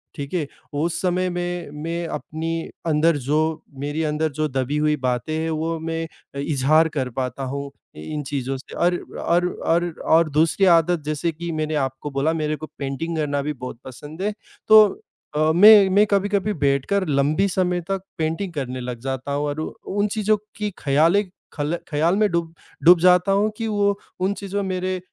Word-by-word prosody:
ठीक 140 +1 -6
है? 165 -5 -1 0.3
उस 160 +4 -1
समय 185 0 +1
मैं 175 -2 -4
मैं 170 +1 -3
अपनी 165 +1 -4 0.2
अंदर 160 0 +3
जो 145 +3 0 0.4
मेरी 145 +3 -2
अंदर 155 +1 0
जो 155 +2 -1
दबी 135 +2 -1
हुई 150 0 +2
बातें 130 +3 -2
हैं, 160 +1 -1
वो 160 +1 -2
मैं 165 0 -3 0.3
अ, - - -4
इज़हार 150 +3 +3
कर 135 -4 -2
पाता 130 +2 -3
हूँ 140 +1 -4 0.3
इन 150 - -5
चीज़ों 135 -1 -3
से 130 - -12
और 175 +1 +2 0.2
और 175 +1 +2 0.2
और 170 +1 +2 0.2
और 160 0 +4
दूसरी 160 +6 +3
आदत 170 -1 +4
जैसे 155 +2 -1
कि 170 +2 -5
मैंने 155 -1 -2
आपको 135 0 -2
बोला 140 +4 +1
मेरे 155 -1 -1
को 155 +1 -8
पेंटिंग 140 +4 -3
करना 145 -2 0
भी 150 +1 -2
बहुत 125 -3 -8
पसंद 145 +6 -9
है। 210 +1 0 0.4
तो 215 0 +10 0.5
अ, 155 +1 +3
मैं 205 +2 +8
मैं 200 +3 +5
कभी-कभी 200 +1 +1
बैठकर 140 +8 +1
लंबी 150 +6 +2
समय 180 -1 0
तक 195 -1 -1 0.2
पेंटिंग 165 +4 -2
करने 130 -4 -4
लग 125 -1 -5
जाता 130 +1 -4
हूँ 145 +1 -1
और 145 +2 -3
वो - - -3 0.3
उन 205 - +3
चीज़ों 215 0 +2 0.2
की 210 0 -2
ख़यालें 160 +9 +3 0.3
खल 150 +3 -2
ख़्याल 160 +4 +2
में 210 -1 +3
डूब 170 -1 -1 0.3
डूब 175 +1 +8
जाता 180 +2 +4
हूँ 205 +2 +2
कि 225 - -2
वो 200 -1 +1 0.2
उन 190 +2 +1
चीज़ों 200 0 -3
मेरे 185 -1 -2
160 Hz, 185 wpm, -22 LUFS, 145-180 Hz, 0.5 s, तो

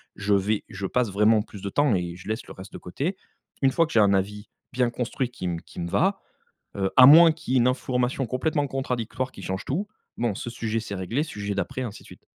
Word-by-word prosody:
je 105 0 0
vais 100 +2 +1
je 100 - -5
passe 120 +1 0
vraiment 105 +2 +4
plus 105 -2 -11
de 100 - -4
temps 145 +2 +2
et 85 -1 -3
je 95 +3 -11
laisse 110 +2 -3
le - - -9
reste 95 - -11
de - - -6
côté. 155 - -4 0.4
Une 135 -1 +4
fois 165 +3 +3
que 160 - -10
j'ai 115 - +5
un 100 -1 +5
avis 105 +2 -2 0.2
bien 125 -1 +1
construit 125 +1 -2
qui 120 -7 -6
me 85 -1 -3
qui 90 - -9
me 85 - -3
va, 195 - +1 0.6
heu, 95 -1 0
à 130 - +10
moins 165 +3 +9
qu'il 155 -5 -5
y - - +4
ait - - +5
une 120 - +4
information 125 0 -1
complètement 145 +4 0
contradictoire 130 -1 -3
qui - - -11
change 95 +2 -4
tout, 190 +10 -2 0.3
bon 115 -4 -1
ce 120 - -5
sujet 115 -1 -2
c'est 100 -2 -6
réglé, 105 - -1
sujet 105 -8 -5
d'après 115 +6 -3
ainsi 110 -4 -7
de - - -17
suite. - - -15
115 Hz, 245 wpm, -25 LUFS, 100-130 Hz, 0.6 s, à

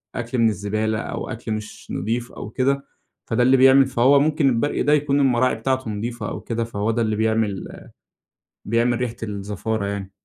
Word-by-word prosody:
أكل 120 +1 -3
من 115 -1 +4
الزبالة 110 +2 -1
أو - - -5
أكل 115 -1 -6
مش 110 0 -6
نظيف 120 +5 -2
أو 105 - -8
كده، 135 +3 0 0.4
فده 120 +2 +1
اللي 130 +2 +5
بيعمل 135 +1 +7
فهو 130 +2 +4
ممكن 150 -1 +2
البرقي 125 +4 0
ده 145 +3 +3
يكون 145 -1 +2
المراعي 130 -2 +3
بتاعته 130 +1 -1
نظيفة 110 +1 -4
أو - - -6
كده، 115 0 -2
فهو 110 -1 -2
ده 115 +1 -1
اللي 110 -1 0
بيعمل 110 -3 0 1.0
بيعمل 120 +2 +1
ريحة 120 -2 -2
الزفارة 105 +1 -3
يعني. 100 -1 -4
115 Hz, 175 wpm, -22 LUFS, 110-130 Hz, 1.0 s, بيعمل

